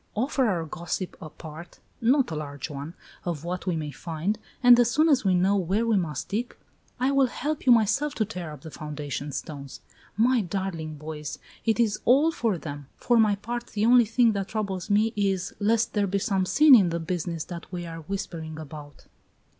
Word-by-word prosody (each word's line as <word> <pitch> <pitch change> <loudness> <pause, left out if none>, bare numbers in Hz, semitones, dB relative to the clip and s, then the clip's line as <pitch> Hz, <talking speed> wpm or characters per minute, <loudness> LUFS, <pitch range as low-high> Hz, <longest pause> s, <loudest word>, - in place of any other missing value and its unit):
Offer 260 +3 +1
our 170 -5 -1
gossip 175 +3 -4
a 155 - -7
part 160 +3 -11 0.2
not 255 - +3
a - - -3
large 145 0 -5
one 145 +4 -7 0.3
of 165 -4 -3
what 180 +2 -4
we 180 - +1
may 155 -2 -3
find, 170 +7 -3 0.2
and 245 -1 +8
as 240 -1 +4
soon 310 +6 +3
as 270 -5 +4
we 190 -2 +3
know 190 +3 +3
where 195 +4 +1
we 230 -2 +2
must 160 -7 -2
dig, 230 +5 -3 0.4
I 260 +2 +2
will 275 -1 +4
help 295 +3 -4
you - - +8
myself 240 +6 +3
to 215 - +1
tear 180 -7 -6
up 150 -3 -10
the 160 - -9
foundation 145 -1 -5
stones. 140 -1 -7 0.4
My 240 +2 +4
darling 175 -4 -4
boys! 150 0 -6 0.3
It 225 0 +2
is 220 -3 +2
all 285 +7 +5
for 225 - 0
them! 145 -3 -7
For 240 - +2
my 215 -2 +4
part, 240 +4 -5
the 210 0 -1
only 240 0 +6
thing 230 +1 +3
that 200 -2 -2
troubles 200 -4 -3
me 215 +2 +3
is 195 -3 0
lest 225 +2 +1
there 205 -2 +1
be 195 +1 0
some 190 -1 0
sin 300 +5 +6
in 200 -8 +7
this 170 0 -3
business 170 -1 -3
that 175 0 -9
we 175 -2 -4
are 165 -1 -7
whispering 160 -3 -5
about." 150 -2 -10
190 Hz, 200 wpm, -26 LUFS, 160-230 Hz, 0.4 s, and